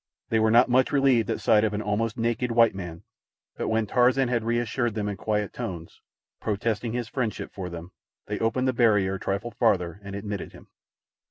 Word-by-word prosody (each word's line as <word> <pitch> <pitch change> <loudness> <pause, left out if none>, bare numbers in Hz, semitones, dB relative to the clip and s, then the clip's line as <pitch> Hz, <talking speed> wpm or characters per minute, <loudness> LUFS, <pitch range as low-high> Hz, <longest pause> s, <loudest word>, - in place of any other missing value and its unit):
They 110 - +2
were 110 0 +3
not 120 +3 +6
much 130 +1 +3
relieved 135 -6 +3
at - - -2
sight 105 -1 +4
of 105 -1 0
an 105 - -2
almost 105 +2 -1
naked 120 +2 0
white 115 -1 +5
man; 90 -4 -7 0.5
but - - -3
when 110 0 +1
Tarzan 125 +3 +3
had 120 -2 0
reassured 120 0 -1
them 105 -2 -2
in 100 - -2
quiet 105 0 -2
tones, 85 -3 -7 0.4
protesting 110 +2 -2
his 120 -1 -2
friendship 115 -2 -3
for 95 -2 -5
them, 85 +1 -8 0.3
they - - -4
opened 130 +3 0
the 130 - +2
barrier 105 -6 +3
a 95 - -4
trifle 100 +6 -3
farther 90 -3 0
and 100 0 -7
admitted 100 -1 -5
him. - - -15
110 Hz, 195 wpm, -26 LUFS, 100-120 Hz, 0.5 s, not